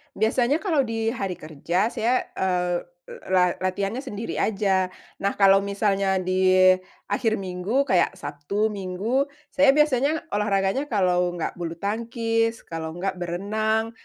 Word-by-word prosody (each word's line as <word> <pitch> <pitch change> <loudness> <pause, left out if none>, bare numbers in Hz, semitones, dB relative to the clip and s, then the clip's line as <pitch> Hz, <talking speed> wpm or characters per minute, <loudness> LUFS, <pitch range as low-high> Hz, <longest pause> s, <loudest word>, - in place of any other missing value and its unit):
Biasanya 245 +7 +2
kalau 320 -9 +1
di 225 -2 -2
hari 195 -6 -2
kerja, 165 +6 -1
saya, 240 +2 +1 0.2
eee, 180 -2 0 0.5
la 180 -1 +3
latihannya 195 +5 -2
sendiri 230 -3 -5
aja. 195 -3 +1 0.4
Nah, 200 - +1
kalau 195 0 +7
misalnya 200 -1 +1
di 185 0 +4 0.4
akhir 225 -2 +1
minggu, 190 +8 -1
kayak 180 -6 +2
Sabtu 150 +10 -2
Minggu. 205 +8 -1 0.2
Saya 275 -1 +5
biasanya 300 +1 +2
olahraganya 205 +6 0
kalau 180 -4 +2
enggak 170 - -2
bulutangkis, 225 +6 -1
kalo 160 -1 -5
enggak 185 0 -3
berenang, 215 +6 -1
200 Hz, 125 wpm, -24 LUFS, 185-230 Hz, 0.5 s, kalau